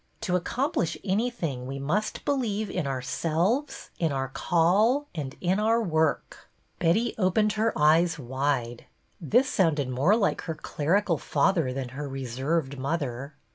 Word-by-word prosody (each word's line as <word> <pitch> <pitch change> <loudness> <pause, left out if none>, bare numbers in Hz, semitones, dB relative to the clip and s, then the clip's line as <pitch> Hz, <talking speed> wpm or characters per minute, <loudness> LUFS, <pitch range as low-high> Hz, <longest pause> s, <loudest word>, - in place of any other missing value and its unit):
To 180 - 0
accomplish 180 - -1
any 205 +5 +1
thing 145 - -4
we 135 +1 -5
must 160 +11 -2
believe 220 -7 -1
in 175 -6 -2
ourselves, 165 - -1
in 165 -3 +1
our 135 -1 -2
call, 195 - +2
and 145 -5 -5
in 185 +3 +1
our 225 +2 +3
work." 160 -8 -1 0.3
4 170 - 0
BETTY - - +6
BAIRD'S 170 - +3
VENTURES 235 +1 -1
Betty - - +1
opened 210 +3 +2
her 220 +1 +1
eyes 160 +2 +4
wide. 130 -2 -2 0.4
This 245 - +3
sounded 155 - +1
more 140 +12 +3
like 220 -3 +1
her 160 - -2
clerical 165 +3 0
father 165 -9 +1
than 130 -1 -4
her 140 +2 -6
reserved 135 +3 -2
mother. 140 -1 -3
165 Hz, 160 wpm, -27 LUFS, 140-205 Hz, 0.4 s, BETTY